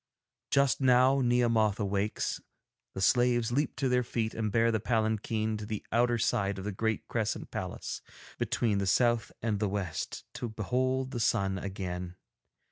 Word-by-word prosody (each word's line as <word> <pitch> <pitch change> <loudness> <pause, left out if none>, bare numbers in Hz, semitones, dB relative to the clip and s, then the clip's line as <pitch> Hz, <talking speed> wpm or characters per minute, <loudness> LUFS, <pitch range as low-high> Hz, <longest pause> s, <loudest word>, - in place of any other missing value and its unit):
Just 140 -1 +3
now 130 +1 +5
Nehemoth 115 -4 +2
awakes, 100 0 -1 0.5
the 95 - -3
slaves 120 +1 +3
leap 145 +5 0
to 135 - 0
their 125 0 +3
feet 115 -2 -2
and 110 -2 -2
bear 115 +1 +3
the 110 - +1
palanquin 110 0 0
to 105 - -6
the 105 -2 -4
outer 120 0 +3
side 100 -4 0
of 95 - -5
the 105 - -2
great 110 +2 -2
crescent - - -2
palace - - -5 0.4
between 105 -4 +1
the 100 - -1
south 120 +3 +2
and 110 -3 0
the 105 -1 0
west, 95 -5 -3
to 120 - -4
behold 130 +4 -1
the 120 - -3
sun 100 -5 +1
again. 90 -2 -5
110 Hz, 160 wpm, -30 LUFS, 100-120 Hz, 0.5 s, now